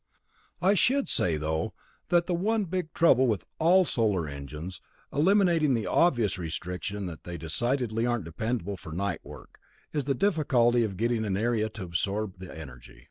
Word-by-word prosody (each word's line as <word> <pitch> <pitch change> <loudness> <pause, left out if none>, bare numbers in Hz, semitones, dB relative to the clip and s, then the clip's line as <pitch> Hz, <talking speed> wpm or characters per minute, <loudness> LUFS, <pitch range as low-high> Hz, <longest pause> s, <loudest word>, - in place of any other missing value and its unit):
I 190 +2 +5
should 260 +7 +2
say, 85 -3 +1
though, 80 +1 -2 0.3
that 175 -1 +3
the 180 - -1
one 210 +5 +1
big 180 -2 -3
trouble 130 -7 +4
with 110 -5 -1
all 180 +3 +5
solar 105 - +1
engines, 75 +5 -7 0.3
eliminating 170 -3 +3
the 110 -3 -2
obvious 120 - +2
restriction 90 +4 -4
that 85 -3 -7
they 85 -1 -6
decidedly 115 - -1
aren't 120 -7 -1
dependable 100 +3 -3
for 80 - -10
night 100 +1 -2
work, - - -13 0.3
is 145 -4 -1
the 140 -1 +1
difficulty 125 - +3
of 100 -4 -3
getting 115 +1 +1
an 100 -3 -1
area 110 0 +1
to 110 -2 -8
absorb 95 +3 -2
the 95 -1 -8
energy. 60 -6 -11
110 Hz, 165 wpm, -28 LUFS, 90-150 Hz, 0.3 s, I